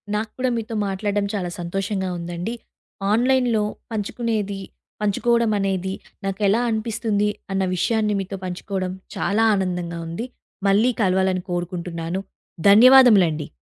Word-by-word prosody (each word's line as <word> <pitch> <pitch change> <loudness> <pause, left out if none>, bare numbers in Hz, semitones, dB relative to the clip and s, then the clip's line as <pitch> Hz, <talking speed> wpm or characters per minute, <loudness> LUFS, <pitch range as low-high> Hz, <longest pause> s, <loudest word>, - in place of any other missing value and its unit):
నాకు 215 +1 -2
కూడా 255 0 +1
మీతో 225 0 -4
మాట్లాడడం 200 +1 -1
చాలా 180 -4 -2
సంతోషంగా 190 +2 -2
ఉందండి. 175 +5 -4 0.6
ఆన్‌లైన్‌‌లో 245 -2 +2 0.3
పంచుకునేది 210 -2 -2 0.4
పంచుకోవడం 230 +2 +2
అనేది, 190 -1 -1 0.3
నాకెలా 200 +3 +1
అనిపిస్తుంది 215 -2 0 0.2
అన్న 195 0 +1
విషయాన్ని 215 +3 +1
మీతో 195 0 -4
పంచుకోవడం 185 +1 -3 0.2
చాలా 215 +3 +1
ఆనందంగా 180 -3 -2
ఉంది. 170 +8 -4 0.4
మళ్ళీ 205 +5 +4
కలవాలని 190 -1 +2
కోరుకుంటున్నాను. 175 0 -3 0.5
ధన్యవాదములండి. 210 - +7
200 Hz, 105 wpm, -22 LUFS, 185-220 Hz, 0.6 s, ధన్యవాదములండి